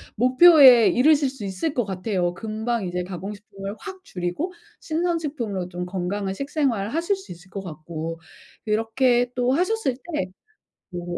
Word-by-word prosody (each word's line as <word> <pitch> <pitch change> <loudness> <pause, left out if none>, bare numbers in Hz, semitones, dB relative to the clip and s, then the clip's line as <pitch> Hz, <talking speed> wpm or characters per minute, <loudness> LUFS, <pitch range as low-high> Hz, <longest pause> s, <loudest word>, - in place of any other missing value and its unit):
목표에 255 -1 +8
이르실 285 +2 +4
수 255 -6 -8
있을 195 - -2
것 245 - +1
같아요. 185 -2 -1
금방 220 +2 -3
이제 180 0 -2
가공식품을 195 +2 -7
확 380 -2 -9
줄이고 180 - -3 0.3
신선식품으로 305 - -2
좀 180 0 -5
건강한 190 +2 -3
식생활 265 -4 -1
하실 335 - 0
수 385 - -12
있을 175 +2 -12
것 195 - -5
같고. 165 -1 -6 0.5
이렇게 240 +3 +2
또 250 0 +1
하셨을 365 - 0 0.2
때 190 - 0 0.7
뭐 175 -1 -5
220 Hz, 300 characters per minute, -24 LUFS, 185-275 Hz, 0.7 s, 목표에